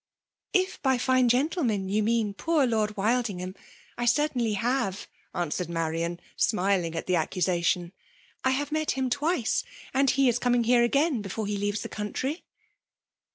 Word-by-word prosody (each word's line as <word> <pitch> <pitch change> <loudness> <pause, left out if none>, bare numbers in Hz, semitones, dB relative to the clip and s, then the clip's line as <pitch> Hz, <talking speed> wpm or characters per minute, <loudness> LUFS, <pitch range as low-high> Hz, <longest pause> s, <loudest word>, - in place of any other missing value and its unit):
'' - - -65
*' - - -65
If 375 0 +1
by 265 -2 +2
fine 255 0 +3
gentlemen 245 - +1
you 205 +3 +1
mean 220 -1 +1
poor 315 +5 +1
Lord 215 -3 0
Wildingham, 200 -4 -1 0.4
I 240 - 0
certainly 245 -3 +2
haver 205 -2 -1 0.3
answered 175 0 -2
Ma 165 -1 -1
rion, 165 +2 -2 0.2
snaling 185 -5 +1
at 165 - -3
the 180 -1 +2
accusation. 175 +1 0 0.2
*' - - -32
I 260 - +3
have 285 +2 -1
met 310 0 -1
him 260 -1 -1
twice 290 -3 +1
— - - -18
and 270 0 +3
he 275 +1 +3
is 240 0 +2
coming 245 -1 +2
here 240 +1 +4
again 275 +1 +2
be* 200 - -7
ft>re 210 +1 -3
he - - -1
leaves 205 +1 -1
the - - -4
country." 260 - -3
230 Hz, 180 wpm, -27 LUFS, 195-260 Hz, 0.4 s, here